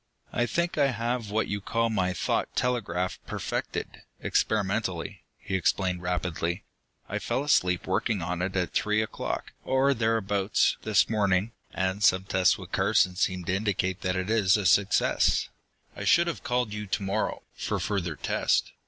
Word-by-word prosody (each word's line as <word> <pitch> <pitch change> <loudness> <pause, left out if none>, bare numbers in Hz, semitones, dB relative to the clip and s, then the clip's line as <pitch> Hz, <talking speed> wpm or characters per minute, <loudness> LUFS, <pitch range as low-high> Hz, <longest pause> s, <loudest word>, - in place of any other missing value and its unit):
"I 120 - +1
think 170 +1 -1
I 140 - +5
have 120 -2 -2
what 110 +2 0
you 100 0 -3
call 115 +3 0
my 95 -4 +1
thought 90 - -1
telegraph 95 -7 -1
perfected, - - -4 0.2
experimentally," - - -1
he 100 - -7
explained 95 0 +1
rapidly. 90 0 -2 0.4
"I - - -3
fell 135 - -1
asleep 90 -11 +2
working 95 +3 0
on 90 +1 -3
it 95 +1 -2
at 90 -2 -1
three 105 +1 +2
o'clock, 110 - -4
or 135 +1 +3
thereabouts, 110 -4 +1
this 110 -2 +3
morning, 100 -1 +1 0.2
and 95 +2 -1
some 95 -3 +4
tests 95 -2 +3
with - - -11
Carson 90 -1 +2
seem 90 -1 0
to 95 - 0
indicate 95 -3 -1
that 90 -1 -1
it 95 +3 -2
is 105 -3 +4
a 105 - -3
success. 100 +2 +3 0.5
I - - -6
should 170 - +5
have 170 - -4
called 125 -3 0
you 105 0 -5
to 100 +1 -1
morrow, 95 0 -1
for - - -2
further 90 -6 -2
test. - - 0
100 Hz, 160 wpm, -27 LUFS, 90-110 Hz, 0.5 s, I